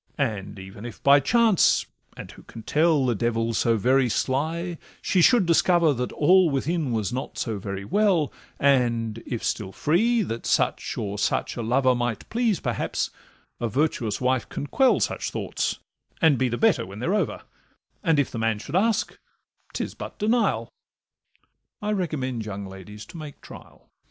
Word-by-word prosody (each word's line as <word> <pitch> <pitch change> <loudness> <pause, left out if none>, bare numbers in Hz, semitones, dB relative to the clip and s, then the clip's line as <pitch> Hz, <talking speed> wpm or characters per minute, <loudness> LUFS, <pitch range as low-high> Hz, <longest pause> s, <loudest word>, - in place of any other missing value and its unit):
And 110 -9 -2
even 95 +2 -10
if 120 -2 -9
by 140 +1 +7
chance—and 225 - +1
who - - -14
can 115 - -11
tell? 155 -1 +2
The 125 - +2
devil 115 +1 -1
's - - 0
so 115 -1 +2
very 130 +3 +3
sly—she 165 - -1
should 235 +2 +5
discover 170 -1 +4
That 125 -1 -3
all 180 +3 +5
within 150 +1 -1
was 110 0 -1
not 130 - -5
so 110 -4 -2
very 100 0 -5
well, 185 - +2 0.3
And, 120 -5 +1
if 120 - -4
still 100 -4 -2
free, 220 - +2
that 115 -9 -5
such - - 0
or 100 0 -3
such 105 - 0
a 120 - -4
lover 130 +3 +2
Might 120 -2 -2
please 225 -5 +1
perhaps, - - -2 0.5
a 120 - -1
virtuous 120 -5 0
wife 130 -1 0
can - - -4
quell 260 - +3
Such - - -1
thoughts, - - -2 0.4
and 160 -4 +5
be 130 -1 +2
the 120 - -2
better 225 -3 +3
when 95 +2 -9
they're 125 - -1
over; 210 - -1 0.6
And 165 -5 +3
if 145 - +1
the 115 - -5
man 115 -1 +1
should 140 +9 -7
ask, 220 +3 +1 0.5
'tis - - -4
but - - -8
denial: 210 - 0 1.1
I 210 0 -2
recommend 140 - -2
young 100 -1 -6
ladies 95 +2 -10
to 170 - -12
make 155 -2 -9
trial. - - -14
130 Hz, 165 wpm, -25 LUFS, 115-170 Hz, 1.1 s, by